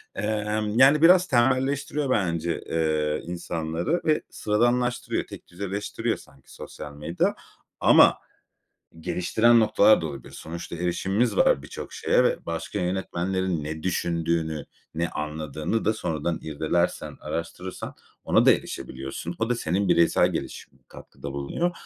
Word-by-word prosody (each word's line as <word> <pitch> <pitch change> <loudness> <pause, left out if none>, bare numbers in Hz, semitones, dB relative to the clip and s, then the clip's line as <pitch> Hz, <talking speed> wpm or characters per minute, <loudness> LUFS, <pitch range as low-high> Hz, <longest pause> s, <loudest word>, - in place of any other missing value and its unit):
Emm, 105 +1 -1
yani, 140 +3 +6
biraz 180 +2 +7
temelleştiriyor 135 +2 +1
bence, 85 -7 0
eee, 80 -2 0
insanları 85 - -2
ve 155 -1 +2
sıradanlaştırıyor. 120 +3 0
Tek - - -11
düz 90 +3 -14
eleştiriyor 100 +1 -2
sanki 65 - -18
sosyal 75 - -9
medya 75 +4 -1 0.4
ama - - +6 0.8
geliştiren 115 +8 +3
noktalar 110 -1 +5
da - - -3
olabilir. 70 -4 -9
Sonuçta 85 +1 -7
erişimimiz 95 +6 0
var 70 - +4
birçok - - -8
şeye - - +2
ve - - +2
başka 85 +5 -4
yönetmenlerin 90 -1 -1
ne 80 +1 -6
düşündüğünü, 85 -3 -1 0.3
ne 85 +1 -1
anladığını 75 +6 -3
da 110 - +3
sonradan 80 -2 -2
irdelersen, 80 +3 -1
araştırırsan 85 +3 -5 0.3
ona - - +3
da - - +8
erişebiliyorsun. 65 +6 -4
O 115 +1 0
da 125 - +2
senin 95 -1 -1
bireysel 85 -1 +4
gelişimine - - -6
katkıda 70 - -10
bulunuyor. 70 - -1
90 Hz, 125 wpm, -25 LUFS, 80-110 Hz, 0.8 s, da